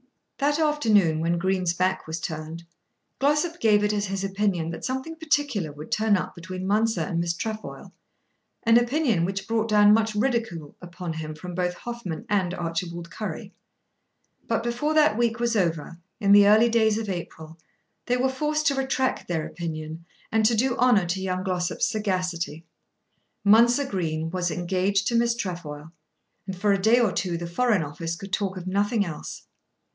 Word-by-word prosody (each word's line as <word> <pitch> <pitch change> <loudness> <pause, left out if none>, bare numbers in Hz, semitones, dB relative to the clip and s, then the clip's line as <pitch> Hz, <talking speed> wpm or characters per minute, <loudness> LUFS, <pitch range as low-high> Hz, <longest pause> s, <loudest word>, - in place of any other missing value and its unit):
That 290 +1 +2
afternoon, 220 - +3
when 170 +2 0
Green's 185 -1 0
back 185 -1 0
was 160 +1 -4
turned, 160 +1 -6 0.6
Glossop 295 +5 +1
gave 210 -2 +4
it 210 0 +1
as 205 -1 -1
his 195 0 -3
opinion 195 -4 -1
that 165 - -7
something 265 +5 -3
particular 290 - -1
would 150 +2 -11
turn 215 -1 +3
up - - -4
between 185 +1 -7
Mounser 215 -1 +1
and 165 +2 -2
Miss 170 0 -1
Trefoil, 220 +4 -6 0.7
an 230 +1 +6
opinion 240 - +1
which 195 +2 -3
brought 225 0 0
down 210 0 +6
much 220 -1 +1
ridicule 215 - -1
upon 175 -1 -6
him 155 -1 -6
from 180 +3 -8
both 180 0 -1
Hoffmann 235 -9 -6
and 185 -3 0
Archibald 170 0 -4
Currie. 215 +2 -6 0.9
But 230 0 0
before 245 +6 -1
that 300 -7 +5
week 235 0 0
was 235 -1 0
over, 170 -3 -1 0.2
in 200 -3 +2
the 205 0 +8
early 220 +3 +6
days 220 -2 +3
of 225 -1 -3
April, 165 -3 -6 0.5
they 245 - +2
were 255 +1 +2
forced 300 +3 -1
to 280 - +3
retract 265 -1 -1
their 165 -3 -1
opinion 160 -1 -6 0.3
and 220 0 +2
to 230 - +2
do 250 +3 +1
honour 240 -7 +4
to 180 +2 -2
young 185 -1 -2
Glossop's 180 -2 -1
sagacity. 180 -6 -2 0.8
Mounser 235 +6 +5
Green 165 -7 -2
was 180 -1 -1
engaged 185 +4 0
to 235 - -1
Miss 235 0 +2
Trefoil, 165 -7 -6 0.6
and 190 -1 -5
for 205 +1 +3
a 195 - 0
day 225 +4 +5
or 230 -5 +3
two 180 -1 -2
the 170 - -5
Foreign 210 +2 +1
Office 165 +3 -4
could 195 +2 -10
talk 195 -2 -1
of 180 - -7
nothing 205 +3 +1
else. 165 -4 -7
195 Hz, 175 wpm, -25 LUFS, 170-230 Hz, 0.9 s, the